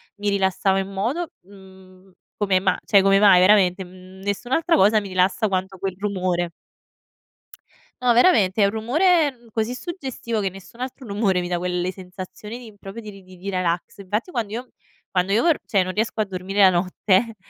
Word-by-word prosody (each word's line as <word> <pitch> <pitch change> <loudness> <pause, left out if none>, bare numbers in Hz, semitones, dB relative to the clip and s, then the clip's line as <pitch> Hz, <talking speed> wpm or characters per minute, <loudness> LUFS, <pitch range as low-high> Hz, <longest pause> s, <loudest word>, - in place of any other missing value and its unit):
mi 205 0 -2
rilassavo 195 -1 +1
in 195 0 -4
modo, 250 - -2
mhmm, 190 -1 -17 0.2
come 195 -3 +1
ma 190 - +1
cioè 200 -2 +5
come 195 0 +4
mai 200 -3 +7
veramente, 190 -1 +4
mhmm, 185 +1 -15
nessun'altra 245 - 0
cosa 210 +3 +5
mi 205 - -7
rilassa 185 +4 +1
quanto 190 -1 -2
quel 190 0 -4
rumore. 185 -4 -1 1.5
No 250 -1 +4
veramente, 225 - +4
è 200 - +6
un 200 - +1
rumore 305 +9 +2
n 240 -2 -22
così 225 +2 -1
suggestivo 260 - -4
che 195 - 0
nessun 195 +6 -13
altro 255 0 -6
rumore 200 -2 +1
mi 175 - -3
dà 175 0 -1
quelle 180 +1 -2
sensazioni 185 +4 -9
di 225 -4 -13
proprio 195 +4 -9
di 205 -3 -11
di 185 +1 -9
relax. 180 0 -2
Infatti 210 - -3
quando 225 -7 -3
io 240 +2 -4
m 255 - -29 0.4
quando 185 +1 0
io 220 - +3
or 330 -3 +3
cioè 195 -4 +2
non 185 0 -4
riesco 220 +1 -2
a 215 - +2
dormire 195 +1 -5
la 190 - +8
notte, 190 +5 +1
195 Hz, 185 wpm, -22 LUFS, 185-225 Hz, 1.5 s, la